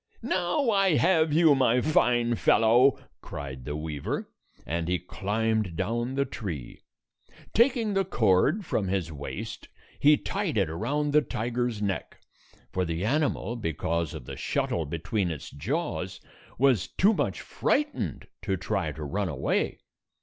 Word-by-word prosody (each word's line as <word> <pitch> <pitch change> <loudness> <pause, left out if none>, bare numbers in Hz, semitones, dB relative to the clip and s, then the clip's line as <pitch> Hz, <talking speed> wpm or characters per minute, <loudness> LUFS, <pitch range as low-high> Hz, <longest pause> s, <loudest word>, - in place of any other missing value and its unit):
"Now 185 +4 +1
I 195 -5 +3
have 160 -2 +3
you, 160 0 +6
my 125 -3 +3
fine 120 -4 +2
fellow!" 120 +4 +4 0.2
cried 65 -3 -7
the 75 - -3
weaver, 75 -2 -4 0.3
and 85 +1 -2
he 90 0 +1
climbed 105 +1 -1
down 120 +8 -1
the 140 0 +1
tree. 85 - -6 0.7
Taking 235 -2 +3
the 195 0 +2
cord 120 - +2
from 100 -9 -1
his 90 -3 -1
waist, 70 -2 -7 0.3
he 150 +1 +6
tied 195 - -2
it 95 -6 +1
around 145 - -1
the 150 - +6
tiger's 120 -3 -2
neck; 95 -6 -3 0.5
for 95 - 0
the 85 +2 -2
animal, 130 -4 0
because 85 -5 -2
of 60 - -8
the - - -7
shuttle 80 -3 -1
between 85 +5 -1
its 75 -4 -6
jaws, 95 - -3 0.4
was 125 -9 +3
too 205 +4 +3
much - - -1
frightened 280 - -1 0.2
to 95 - -1
try 90 - -1
to 80 - -7
run 95 +6 -2
away. 70 -4 -1
110 Hz, 140 wpm, -27 LUFS, -, 0.7 s, you